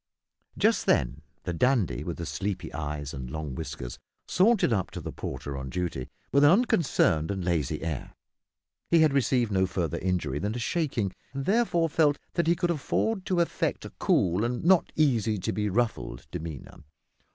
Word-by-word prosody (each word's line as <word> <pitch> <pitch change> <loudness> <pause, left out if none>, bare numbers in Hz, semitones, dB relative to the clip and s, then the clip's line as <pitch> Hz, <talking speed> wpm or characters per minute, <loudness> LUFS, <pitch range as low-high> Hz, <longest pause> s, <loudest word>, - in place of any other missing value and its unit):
Just - - +2
then 65 +5 +2 0.2
the 90 - -3
dandy 110 - +1
with - - -4
the 85 - -4
sleepy 100 +3 -3
eyes 75 -1 -4
and 65 -2 -6
long 75 -1 -4
whiskers 70 -5 -6 0.3
sauntered 195 - +3
up 95 -4 0
to - - -7
the - - -5
porter 70 - -5
on 65 0 -5
duty, 85 -5 -3 0.2
with 140 +1 +4
an 145 - +8
unconcerned 165 - +3
and 95 -3 -2
lazy 80 -4 0
air. 80 -5 -4 0.7
He 165 - +5
had 155 -3 +4
received 125 -4 +2
no 95 -1 +2
further 85 -2 -2
injury 85 -7 -1
than 105 +5 -2
a - - -2
shaking, 120 - -1 0.2
and 135 0 -3
therefore 195 -6 +2
felt 150 -2 +3 0.2
that 170 -2 0
he 170 - +4
could 175 0 0
afford 185 +6 -1
to 180 -2 +2
affect 170 - -1
a - - -8
cool 90 +3 +2
and 120 +1 -1
not 185 -1 +4
easy 115 -8 +2
to 90 - -2
be 105 -1 0
ruffled 110 - -1
demeanour. 80 -4 -7
100 Hz, 175 wpm, -28 LUFS, -, 0.7 s, an